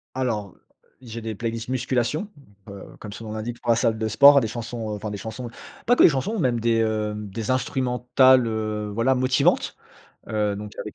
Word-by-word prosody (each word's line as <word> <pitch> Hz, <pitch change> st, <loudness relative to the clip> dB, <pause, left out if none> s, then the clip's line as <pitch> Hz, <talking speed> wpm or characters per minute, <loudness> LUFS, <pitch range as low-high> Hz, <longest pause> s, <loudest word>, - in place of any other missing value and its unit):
Alors, 115 Hz, -6 st, -2 dB
heu, -, -, -30 dB, 0.4 s
j'ai 115 Hz, -2 st, -8 dB
des 110 Hz, -1 st, -5 dB
playlists 115 Hz, +2 st, -4 dB
musculation, 130 Hz, -, -1 dB, 0.4 s
heu, 100 Hz, -1 st, -9 dB, 0.2 s
comme 105 Hz, -2 st, -8 dB
son 115 Hz, +1 st, -9 dB
nom 105 Hz, -, -6 dB
l'indique, 115 Hz, +2 st, -5 dB
pour 120 Hz, -, -5 dB
la -, -, +4 dB
salle 115 Hz, -1 st, +1 dB
de 110 Hz, 0 st, -2 dB
sport, 140 Hz, +5 st, +7 dB
des 115 Hz, -, -1 dB
chansons, 115 Hz, 0 st, -5 dB
enfin 105 Hz, 0 st, -4 dB
des 105 Hz, -, -5 dB
chansons, 120 Hz, +3 st, -7 dB, 0.4 s
pas 245 Hz, -, +4 dB
que -, -, +5 dB
des -, -, +9 dB
chansons, 175 Hz, +11 st, -2 dB
même 125 Hz, -8 st, +1 dB
des, 115 Hz, 0 st, +2 dB
heu, 110 Hz, -1 st, -1 dB
des 105 Hz, +1 st, -6 dB
instrumentales, 130 Hz, 0 st, +3 dB
heu, 110 Hz, -1 st, -3 dB
voilà, 115 Hz, +4 st, +2 dB
motivantes. 130 Hz, 0 st, +1 dB, 0.5 s
Heu, 105 Hz, -2 st, -1 dB
donc 105 Hz, 0 st, -8 dB
avec 105 Hz, -, -7 dB
115 Hz, 195 wpm, -24 LUFS, 110-125 Hz, 0.5 s, des